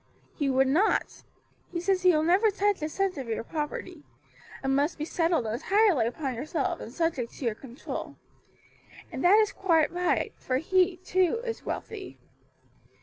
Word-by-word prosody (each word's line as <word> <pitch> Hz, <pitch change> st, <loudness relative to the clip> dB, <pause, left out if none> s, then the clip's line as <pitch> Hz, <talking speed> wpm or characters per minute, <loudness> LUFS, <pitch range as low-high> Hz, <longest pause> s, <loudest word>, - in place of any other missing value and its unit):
"He 285 Hz, -2 st, -1 dB
would 265 Hz, 0 st, +3 dB
not. 350 Hz, +11 st, +1 dB, 0.5 s
He 345 Hz, -, -2 dB
says 370 Hz, +1 st, +1 dB
he 365 Hz, -, +5 dB
will 310 Hz, -2 st, +2 dB
never 375 Hz, +7 st, +4 dB
touch 405 Hz, -2 st, 0 dB
a 305 Hz, -, -2 dB
cent 380 Hz, -1 st, -1 dB
of 260 Hz, -, -6 dB
your 225 Hz, 0 st, -2 dB
property; 305 Hz, +4 st, -5 dB, 0.6 s
it -, -, -2 dB
must 285 Hz, +4 st, +1 dB
be 305 Hz, -, -3 dB
settled 330 Hz, -5 st, +1 dB
entirely 310 Hz, -, +2 dB
upon 265 Hz, +2 st, -3 dB
yourself, 280 Hz, +5 st, -2 dB
and -, -, -8 dB
subject 300 Hz, -5 st, -1 dB
to 270 Hz, -, -7 dB
your 230 Hz, -, +1 dB
control. 245 Hz, +3 st, -7 dB, 1.0 s
And -, -, -5 dB
that 370 Hz, +4 st, +7 dB
is 430 Hz, -1 st, +3 dB
quite 330 Hz, -5 st, +2 dB
right; 355 Hz, 0 st, 0 dB
for 255 Hz, -, -1 dB
he, 365 Hz, +4 st, +2 dB
too, 370 Hz, +4 st, +1 dB
is 460 Hz, -1 st, -5 dB
wealthy." 410 Hz, -4 st, -6 dB
330 Hz, 165 wpm, -28 LUFS, 270-375 Hz, 1.0 s, that